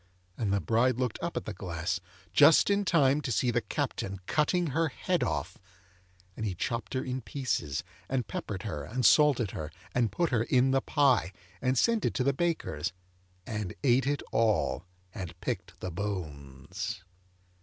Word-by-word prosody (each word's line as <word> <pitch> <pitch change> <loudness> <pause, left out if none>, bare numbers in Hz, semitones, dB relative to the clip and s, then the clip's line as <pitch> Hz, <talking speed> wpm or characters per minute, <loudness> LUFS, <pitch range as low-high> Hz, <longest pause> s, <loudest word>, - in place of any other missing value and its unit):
And 105 -2 -1
the 100 - +2
bride 115 +8 +2
looked 125 -3 -1
up - - -3
at - - -3
the - - -4
glass, 85 +1 -3 0.3
just 155 +6 +7
in 200 0 +2
time 150 -5 +4
to 135 - -3
see 120 +3 +2
the 120 0 +1
Captain 100 -2 -3
cutting 155 - +1
her 165 +2 +2
head 175 +4 -1
off; 75 -4 -2 0.8
and - - -5
he 100 -4 -1
chopped 115 +4 -3
her 130 - 0
in 130 0 -3
pieces, 110 - -2 0.3
and 125 -3 0
peppered 95 -3 -5
her, 90 -10 -4
and 125 - -2
salted 140 -9 +5
her, 75 -1 -5 0.2
and 120 -3 +2
put 170 -3 0
her 120 -3 +2
in 125 +3 +3
the 135 0 +3
pie, 135 -11 +3 0.3
and 130 +1 +1
sent 230 - +3
it - - 0
to 125 - +1
the 140 +1 +2
baker's, 135 - -1 0.5
and 105 -4 -4
ate 130 0 +4
it 145 0 0
all, 95 -8 +1 0.3
and 90 -3 -7
picked - - -4
the 95 - -3
bones. 90 - -5
120 Hz, 175 wpm, -30 LUFS, 95-135 Hz, 0.8 s, just